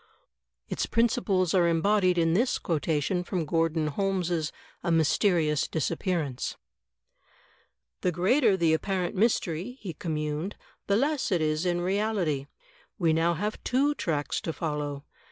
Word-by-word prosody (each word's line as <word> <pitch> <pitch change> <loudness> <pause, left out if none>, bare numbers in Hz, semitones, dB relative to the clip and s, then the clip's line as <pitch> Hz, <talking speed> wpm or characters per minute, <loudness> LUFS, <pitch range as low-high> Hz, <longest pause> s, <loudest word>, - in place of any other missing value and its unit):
Its - - -2
principles 220 -7 +1
are 175 -3 +4
embodied 180 +2 +2
in 165 -1 +3
this 240 +8 +2
quotation 165 +2 -1
from 175 -2 -2
Grordon 165 0 +1
Holmes' 175 -2 -1 0.3
"A 175 - 0
Mysterious 160 -1 +2
Disappearance:" 160 -3 -2 1.4
"The 180 - +1
greater 195 - +3
the 165 -3 +3
apparent 180 +1 -1
mystery," 195 +1 0
he 185 -5 -6
communed, 155 +3 -3 0.3
"the 200 - +3
less 285 -1 0
it 180 - +3
is 155 +2 0
in 175 0 0
reality. 185 -7 0 0.5
We 165 -5 +2
now 165 +2 +2
have 210 +6 -3
two 275 +4 +2
tracks 150 - -2
to 165 - -3
follow. 150 -3 -3
175 Hz, 130 wpm, -28 LUFS, 160-195 Hz, 1.4 s, are